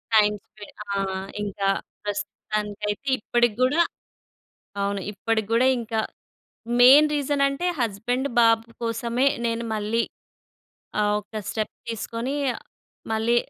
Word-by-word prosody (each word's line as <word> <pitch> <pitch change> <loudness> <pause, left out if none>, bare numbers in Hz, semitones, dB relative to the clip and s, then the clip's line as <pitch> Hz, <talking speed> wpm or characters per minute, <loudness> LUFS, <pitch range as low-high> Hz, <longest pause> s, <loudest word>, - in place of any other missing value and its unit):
Time 210 -1 +5
spray 210 -2 -13 0.2
ఆ! 200 - -2 0.5
ఇంకా 200 -1 -1 0.3
ప్రస్తుతానికైతే 210 +2 -3
ఇప్పటికి 240 0 +2
కూడా 290 +7 +4 1.0
అవును. 200 0 -1
ఇప్పటికి 220 +1 -1
కూడా 245 +3 +5
ఇంకా 225 -1 -2 0.8
మెయిన్ 275 +5 +9
రీజన్ 285 -1 +1
అంటే 275 +6 -2
హస్బెండ్ 240 +4 0
బాబు 225 -1 +5 0.2
కోసమే, 235 +3 0 0.2
నేను 230 0 -1
మళ్ళీ 215 +2 0 1.0
ఆహ్, 210 0 +2
ఒక్క 210 +2 -23 0.2
స్టెప్ 215 -1 -3
తీసుకొని 230 +3 -3 0.8
మళ్ళీ 225 +2 +2
225 Hz, 105 wpm, -25 LUFS, 210-240 Hz, 1.0 s, మెయిన్